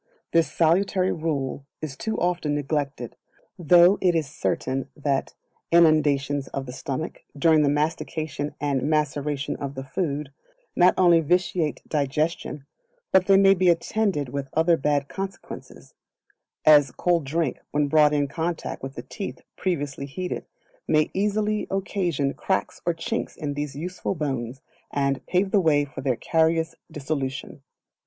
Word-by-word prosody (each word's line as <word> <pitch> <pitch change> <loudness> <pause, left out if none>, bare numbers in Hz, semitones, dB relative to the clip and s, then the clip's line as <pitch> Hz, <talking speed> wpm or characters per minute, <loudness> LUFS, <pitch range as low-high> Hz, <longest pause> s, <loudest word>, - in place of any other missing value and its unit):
This 165 -3 +3
salutary 185 +3 +2
rule 140 -4 -3
is 150 -4 -5
too 220 +10 -3
often 175 -4 0
neglected, 140 -4 -3 0.4
though 175 +3 +6
it 180 -2 +3
is 160 -2 +1
certain 135 -2 -2
that 140 -2 -1 0.4
innundations 145 -4 +3
of 135 - -5
the 125 - -7
stomach, 140 +4 -5 0.2
during 160 +1 +4
the 145 - +3
mastication 150 -1 -2
and 140 -2 0
maceration 150 -1 -1
of 140 0 -5
the 135 - -5
food, 145 -1 -3 0.4
not 180 +1 +5
only 175 -2 +6
vitiate 170 -1 0
digestion, 150 0 -1 0.5
but 190 0 +4
they 195 -1 +6
may 195 0 +6
be 185 -1 +3
attended 170 - 0
with 135 +1 -4
other 165 +2 +4
bad 145 -1 0
consequences; 195 +1 -8 0.7
as 145 -3 +7
cold 170 +6 +1
drink, 150 0 -1
when 145 0 +1
brought 150 0 +5
in 145 -1 +1
contact 165 +4 -3
with 135 +1 -7
the - - -6
teeth 200 - -7
previously 145 -6 -2
heated, 180 +6 -5 0.4
may 155 -1 +2
easily 210 +2 0
occasion 180 -7 -1
cracks 190 - -2
or 170 - +2
chinks - - -3
in 145 -2 -3
these 145 -1 -4
useful 180 +5 -4
bones, 135 -4 -3 0.3
and 140 -1 -1
pave 190 +2 +1
the 200 - +4
way 145 -4 +3
for 135 - -8
their 130 -2 +1
carious 160 +4 +1 0.2
dissolution. 140 -2 -4
155 Hz, 145 wpm, -25 LUFS, 140-175 Hz, 0.7 s, as